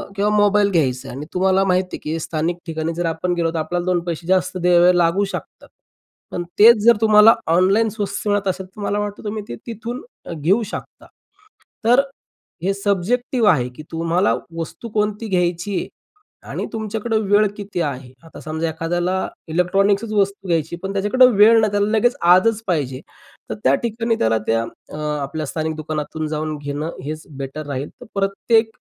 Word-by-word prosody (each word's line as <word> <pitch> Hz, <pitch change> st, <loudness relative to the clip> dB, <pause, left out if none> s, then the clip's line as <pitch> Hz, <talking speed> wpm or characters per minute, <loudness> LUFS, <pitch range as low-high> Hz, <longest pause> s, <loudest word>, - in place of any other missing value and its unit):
किंवा 205 Hz, +1 st, +1 dB
मोबाईल 205 Hz, 0 st, +4 dB
घ्यायचं 135 Hz, -6 st, 0 dB
आहे 125 Hz, -, -7 dB
आणि 150 Hz, -, -6 dB
तुम्हाला 190 Hz, +1 st, +3 dB
माहिती 185 Hz, 0 st, 0 dB
आहे, -, -, -20 dB
की 160 Hz, +2 st, -2 dB
स्थानिक 165 Hz, +2 st, -2 dB
ठिकाणी 160 Hz, 0 st, -3 dB
जर 175 Hz, +1 st, -2 dB
आपण 165 Hz, +2 st, -1 dB
गेलो, 170 Hz, -2 st, 0 dB
तर -, -, -2 dB
आपल्याला 175 Hz, +3 st, -2 dB
दोन 180 Hz, -1 st, +2 dB
पैसे 170 Hz, 0 st, -4 dB
जास्त 185 Hz, 0 st, +1 dB
द्यावे 180 Hz, 0 st, +4 dB
लागू 175 Hz, +3 st, +3 dB
शकतात. -, -, -8 dB, 0.6 s
पण 175 Hz, -, -3 dB, 0.2 s
तेच 230 Hz, +2 st, +9 dB
जर 235 Hz, -1 st, +7 dB
तुम्हाला 215 Hz, 0 st, +7 dB
ऑनलाईन 190 Hz, +7 st, +3 dB
स्वस्त 205 Hz, -1 st, -4 dB
मिळत 205 Hz, -1 st, +1 dB
असेल, 190 Hz, 0 st, -2 dB
तर 190 Hz, +3 st, -13 dB
मला 205 Hz, 0 st, -1 dB
वाटतं 205 Hz, 0 st, -4 dB
तुम्ही 210 Hz, 0 st, -4 dB
ते 120 Hz, -, -4 dB
तिथून 235 Hz, +4 st, -5 dB, 0.3 s
घेऊ 175 Hz, +9 st, +2 dB
शकता -, -, -8 dB, 0.8 s
तर 245 Hz, +3 st, +5 dB
अ, 275 Hz, -, -1 dB, 0.6 s
हे 195 Hz, -, +1 dB
सब्जेक्टिव्ह 210 Hz, +4 st, 0 dB
आहे, 125 Hz, -7 st, +1 dB
की 125 Hz, +5 st, -11 dB
तुम्हाला 170 Hz, +4 st, +1 dB, 0.2 s
वस्तू 165 Hz, +7 st, -6 dB
कोणती 210 Hz, +1 st, -1 dB
घ्यायची 180 Hz, +1 st, 0 dB
आहे -, -, -4 dB, 0.6 s
आणि -, -, -3 dB
तुमच्याकडे 220 Hz, +1 st, -2 dB
वेळ 205 Hz, +1 st, +3 dB
किती 200 Hz, -4 st, -4 dB
आहे. 130 Hz, -4 st, -4 dB
आता 165 Hz, -, -12 dB
समजा 160 Hz, +1 st, -3 dB
एखाद्याला 175 Hz, +3 st, -1 dB, 0.3 s
इलेक्ट्रॉनिक्सच 195 Hz, +5 st, +1 dB
वस्तू 200 Hz, -1 st, 0 dB
घ्यायची 165 Hz, 0 st, 0 dB
पण 195 Hz, +1 st, -3 dB
त्याच्याकडं 245 Hz, +6 st, +4 dB
वेळ 225 Hz, +2 st, +7 dB
नाही, 215 Hz, -2 st, +2 dB
त्याला 205 Hz, 0 st, +1 dB
लगेच 245 Hz, +3 st, +2 dB
आजच 185 Hz, +6 st, +4 dB
पाहिजे, 140 Hz, -7 st, -1 dB, 0.5 s
तर 110 Hz, -, -3 dB
त्या 135 Hz, +2 st, +4 dB
ठिकाणी 230 Hz, 0 st, 0 dB
त्याला 110 Hz, 0 st, +2 dB
त्या 115 Hz, 0 st, +2 dB
अ, 130 Hz, -, -12 dB, 0.3 s
आपल्या 155 Hz, +2 st, -4 dB
स्थानिक 160 Hz, +2 st, -3 dB
दुकानातून 155 Hz, 0 st, -4 dB
जाऊन 155 Hz, 0 st, -3 dB
घेणं 145 Hz, +2 st, -4 dB, 0.2 s
हेच 155 Hz, +1 st, -5 dB
बेटर 140 Hz, +2 st, -6 dB
राहील. 140 Hz, 0 st, -4 dB
तर -, -, -9 dB
प्रत्येक 210 Hz, +3 st, +2 dB
185 Hz, 175 wpm, -20 LUFS, 160-210 Hz, 0.8 s, तेच